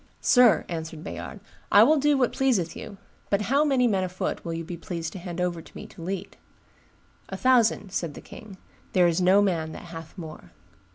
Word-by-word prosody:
"Sir," 245 -3 +5
answered 160 -2 -6
Bayard, - - -7 0.3
"I - - +8
will 310 - +5
do 295 0 +3
what 250 -3 +1
pleaseth 230 -11 +1
you; 210 -3 -9 0.3
but 200 - +2
how 285 +2 +5
many 265 -4 +3
men 195 -4 +1
afoot 185 0 -3
will 165 -1 -4
you 165 - -4
be 175 +1 -6
pleased 165 -1 -5
to 190 - -7
hand 175 -1 -6
over 175 -2 -1
to - - -14
me - - -8
to - - -13
lead?" 185 +2 -5 0.9
"A 190 - -5
thousand," 235 -5 +3
said 170 -6 -3
the - - -8
king: 210 -4 -12 0.4
"there 180 -1 +5
is 170 +1 +2
no 190 +3 +5
man 165 -5 -1
that - - -9
hath 165 +3 -10
more." 160 -3 -10
185 Hz, 205 wpm, -26 LUFS, 165-225 Hz, 0.9 s, I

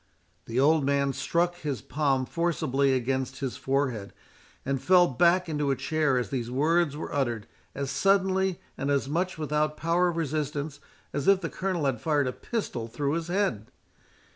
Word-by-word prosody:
The 115 +2 -2
old 150 +2 +4
man 140 0 +1
struck 175 +5 0
his 140 -8 -4
palm 140 -2 0
forcibly 140 -5 +1
against 130 +1 -1
his 135 -3 -3
forehead, 135 -7 -1 0.5
and 135 -1 -1
fell 180 -1 +5
back 175 +7 +3
into 150 -3 -1
a 135 - +2
chair 140 0 +1
as 125 - -2
these 120 -3 -2
words 150 +3 +2
were - - -6
uttered, 120 -7 -1 0.3
as 140 -1 -3
suddenly, 190 +3 +2 0.2
and 135 - -1
as 140 -1 +1
much 175 +5 -1
without 150 0 0
power 170 +2 +2
of 170 - -4
resistance, 150 -2 -2 0.3
as 140 -1 -2
if 195 -1 +5
the 165 - -4
Colonel 185 -5 -2
had 125 -5 0
fired 150 -3 +2
a 125 - -2
pistol 165 - -4
through 140 +5 -2
his 165 0 -2
head. 175 - -1
145 Hz, 170 wpm, -27 LUFS, 135-170 Hz, 0.5 s, fell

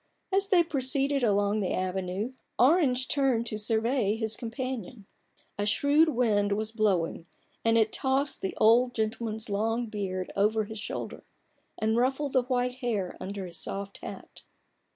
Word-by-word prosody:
As 390 +1 +2
they 370 -4 +5
proceeded 275 -2 0
along 205 -1 +2
the 190 -3 -1
avenue, 185 +5 -2 0.2
Orange 260 -2 +4
turned 265 -5 +1
to 215 -2 -2
survey 220 0 +1
his 220 -1 -2
companion. 240 -3 -5 0.5
A 205 - 0
shrewd 290 +8 +4
wind 210 -6 +2
was 215 +1 -2
blowing, 190 -7 0 0.4
and 230 0 +3
it 220 -1 +2
tossed 270 +2 0
the 190 - -3
old 245 +3 +4
gentleman's 220 0 -2
long 225 +3 0
beard 195 -4 -4
over 215 +2 +2
his 220 0 -7
shoulder, - - -5 0.5
and 220 +1 +1
ruffled 265 +3 0
the 260 - +4
white 250 0 -1
hair 220 -8 -2
under 195 0 -5
his 170 -2 -6
soft 200 0 -4
hat. - - -9
225 Hz, 150 wpm, -28 LUFS, 205-255 Hz, 0.5 s, they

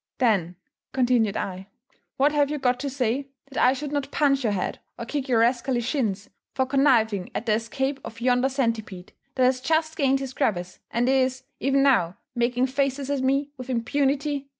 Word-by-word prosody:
"Then," 195 -9 +1 0.4
continued 245 -5 +2
I, 190 0 -5 0.5
"what 285 +2 +4
have 290 -1 +2
you 300 - -2
got 250 -2 +1
to 280 - -3
say, 265 +1 -1 0.2
that - - 0
I 255 - +6
should 285 +1 -5
not 285 -2 -2
punch 275 -2 +2
your 215 -3 +1
head 185 - -2 0.2
or 235 - -5
kick 280 +2 -3
your 230 -3 +4
rascally 240 +1 +1
shins, 225 -6 -1 0.3
for 260 - +2
conniving 235 -8 +2
at 225 - -3
the 220 - +2
escape 265 +5 -1
of 230 - -9
yonder 250 +2 +2
centipede 225 -8 -3 0.2
that 260 - +2
has 255 0 +3
just 315 +2 +1
gained 270 -2 +2
his 270 -1 -5
crevice, 180 -6 -1
and 240 +2 0
is, 260 0 +1 0.2
even 275 +1 +2
now, 210 -11 +3 0.2
making 245 +1 +1
faces 275 +1 -1
at 280 -2 0
me 275 +2 +1
with 255 0 -8
impunity?" 275 +3 0
260 Hz, 185 wpm, -25 LUFS, 230-275 Hz, 0.5 s, I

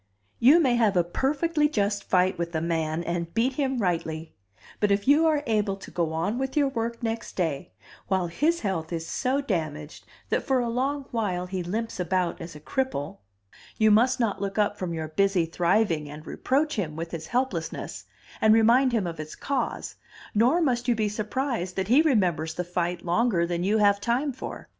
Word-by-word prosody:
"You 280 +8 +7
may 255 -7 +3
have 215 -5 +3
a 175 - +4
perfectly 295 - 0
just 205 -6 0
fight 185 -1 +2
with 170 0 -3
a - - +2
man 165 0 -1
and 170 -1 -3
beat 245 +4 +2
him 265 -1 -1
rightly; 165 -5 -2 0.5
but 210 - +2
if 200 +2 +1
you 300 +4 +5
are 300 -2 +2
able 210 -4 +1
to 195 - -12
go 170 -2 -1
on 170 +9 -1
with 265 +2 -3
your 285 -2 +3
work 235 -1 -3
next 225 0 -3
day, 160 -7 -2 0.3
while 190 -2 +1
his 305 - 0
health 175 -6 -2
is 165 -1 -3
so 270 +2 0
damaged 155 - -4 0.2
that - - +1
for 265 -2 +1
a 240 -1 -1
long 270 +4 -1
while 195 -7 -1
he 185 0 -4
limps 215 +5 -4
about 180 0 -1
as 165 -1 -8
a - - -9
cripple, 155 - -3 0.6
you 220 -1 +4
must 240 +5 +4
not 205 -5 0
look 200 +1 -3
up 205 -1 +2
from 185 -4 -4
your 160 -2 -4
busy 195 +1 +2
thriving 170 -2 +1
and 150 +2 -10
reproach 290 - 0
him 160 -7 -2
with 165 +1 -5
his 160 -1 -6
helplessness, 260 +2 -3 0.4
and 220 0 +6
remind 240 +3 +4
him 220 -5 +1
of 170 -2 -5
its 155 0 -7
cause; 270 -4 -3 0.4
nor 245 +11 +3
must 245 -5 0
you 240 - +3
be 215 -1 0
surprised 215 -2 -2
that 190 +1 -2
he 265 +6 +6
remembers 180 - +1
the 180 - -2
fight 175 0 -2
longer 180 0 +2
than 175 0 -2
you 205 +4 +2
have 200 -1 +3
time 260 +6 0
for. 260 - -8
205 Hz, 195 wpm, -26 LUFS, 170-250 Hz, 0.6 s, You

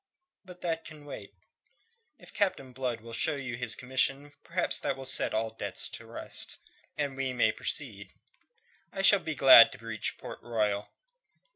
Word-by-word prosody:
"But 180 -1 -14
that 165 -2 -2
can 155 -2 -12
wait. 145 - -9 0.8
If - - -15
Captain 160 - -1
Blood 125 -3 -3
will 115 +1 -11
show 150 +6 0
you 130 -4 -5
his 125 +1 -2
commission, 135 +3 0
perhaps - - +1
that - - -2
will 135 - -8
set 130 - +1
all 110 +1 -1
doubts 110 - -2
at - - -6
rest, - - -3 0.4
and 140 -2 -2
we 135 -1 -2
may 125 - +3
proceed. - - -4 0.8
I 195 - -3
shall 200 +1 +7
be 160 -3 -5
glad 130 -4 +9
to - - -11
reach 110 -2 -3
Port - - -9
Royal." 105 -3 -1
130 Hz, 165 wpm, -29 LUFS, 115-150 Hz, 0.8 s, glad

